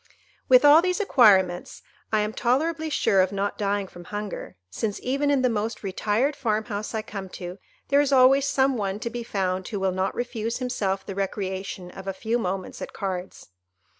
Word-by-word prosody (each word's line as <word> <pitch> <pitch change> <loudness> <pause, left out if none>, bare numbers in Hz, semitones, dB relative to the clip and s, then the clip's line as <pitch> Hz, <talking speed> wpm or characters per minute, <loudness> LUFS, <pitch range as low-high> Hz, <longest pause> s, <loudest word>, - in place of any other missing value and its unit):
"With 255 +2 +7
all 295 +3 +8
these 365 +2 0
acquirements, 195 - +3 0.3
I 215 -1 +3
am 210 +1 -2
tolerably 315 +8 0
sure 195 -9 +3
of 185 0 +1
not 200 0 -2
dying 200 -1 0
from 175 -1 -12
hunger, 205 - -6
since, 210 - -3
even 280 +3 0
in 280 -2 +2
the - - +5
most 225 -1 -2
retired 210 +8 0
farm 220 -5 0
house 215 0 -4
I 220 - -2
come 195 -3 -7
to, 180 +1 -7 0.3
there 280 +1 +5
is 285 -1 0
always 270 +1 +5
some 265 -1 +2
one 200 -1 -2
to 235 - -3
be 240 0 -4
found 190 -4 -2
who 205 - -4
will 190 -1 +1
not 185 +1 -1
refuse 235 -2 -3
himself 195 -7 -2
the 195 - -5
recreation 190 -2 -4
of 190 +1 -10
a 195 - -1
few 225 +5 -1
moments 185 -3 -4
at - - -6
cards. 185 - -5
210 Hz, 195 wpm, -25 LUFS, 190-255 Hz, 0.3 s, all